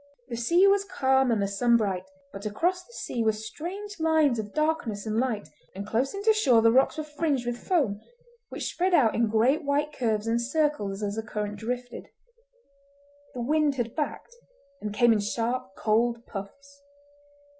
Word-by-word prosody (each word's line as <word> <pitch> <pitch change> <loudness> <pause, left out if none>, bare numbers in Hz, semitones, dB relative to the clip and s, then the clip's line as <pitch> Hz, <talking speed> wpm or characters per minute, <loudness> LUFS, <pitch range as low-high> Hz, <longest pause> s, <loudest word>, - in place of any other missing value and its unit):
The 235 - -3
sea 335 +11 +3
was 395 0 +4
calm 265 -9 +2
and 225 -3 +2
the 200 - +1
sun 235 +4 +3
bright, 195 -3 -2 0.2
but 200 +2 -5
across 355 - 0
the 420 - -21
sea 235 - -3
were 220 - +4
strange 345 - -7
lines 315 -6 +3
of 210 -1 -5
darkness 305 -9 -1
and 220 +1 0
light, 235 -5 -1 0.3
and 200 +1 -5
close 245 - -1
in 400 - -5
to 440 +1 +5
shore 255 - +4
the 230 - +6
rocks 265 +5 +3
were 310 - -2
fringed 295 -4 -1
with 240 0 -3
foam, 255 - +1 0.5
which - - -4
spread 365 0 +2
out 235 -8 +4
in 230 -1 +1
great 240 +8 +2
white 290 +1 0
curves 220 -4 -1
and 230 +1 +1
circles 245 -7 -1
as 205 +1 -2
the - - 0
currents 210 -1 -4
drifted. 245 +1 -5 1.3
The 245 - -3
wind 300 +2 +2
had 235 -3 -3
backed, 310 +9 -4 0.5
and 210 - -4
came 230 +3 +4
in 215 - +1
sharp, 225 0 -2
cold 230 +3 +1
puffs. 280 +8 -9
240 Hz, 180 wpm, -27 LUFS, 215-300 Hz, 1.3 s, the